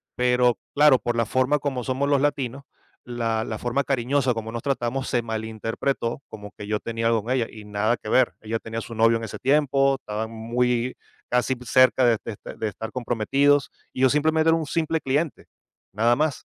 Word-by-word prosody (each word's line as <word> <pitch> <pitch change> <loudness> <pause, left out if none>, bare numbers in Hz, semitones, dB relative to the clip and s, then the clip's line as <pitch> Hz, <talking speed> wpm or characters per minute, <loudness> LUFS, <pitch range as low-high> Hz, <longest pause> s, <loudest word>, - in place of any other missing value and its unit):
Pero 125 -2 +3 0.2
claro, 145 -2 +6
por 120 -1 -2
la 115 - +2
forma 130 +5 +1
como 135 -3 -3
somos 130 +3 -1
los 140 -1 +3
latinos, 140 -2 -1 0.4
la 115 -2 -2
la 110 - -4
forma 125 +5 -1
cariñosa 135 0 +1
como 115 -1 -5
nos 115 0 -4
tratamos, 135 0 -2
se 120 - +1
malinterpretó, 115 +3 -3
como 105 -1 -9
que 105 - -8
yo 105 0 -1
tenía 115 +1 -2
algo 115 -2 +2
con 120 - -4
ella, 120 -3 0
y 110 -1 -11
nada 105 +3 0
que 110 - -8
ver. 130 +1 +3
Ella 110 +1 -3
tenía 115 0 -5
su 115 - -9
novio, 115 +1 +4
en 115 - -7
ese 105 - -8
tiempo. 135 0 +3
Estaba 110 -4 -4
muy 120 +2 -1 0.3
casi 125 +1 +1
p 125 0 -13
cerca 130 +1 +4
de 115 -2 +4
de - - -3
est - - -17 0.2
de 110 - -1
estar 110 +2 -6
comprometidos. 135 +4 +1 0.2
Y - - -4
yo, 130 - +6
simplemente, 160 +3 +2
era 165 - +4
un 160 - -3
simple 160 +2 -1
cliente, 145 +3 -1 0.5
nada 115 +4 +3
más. 150 -3 -1
125 Hz, 205 wpm, -24 LUFS, 115-135 Hz, 0.5 s, claro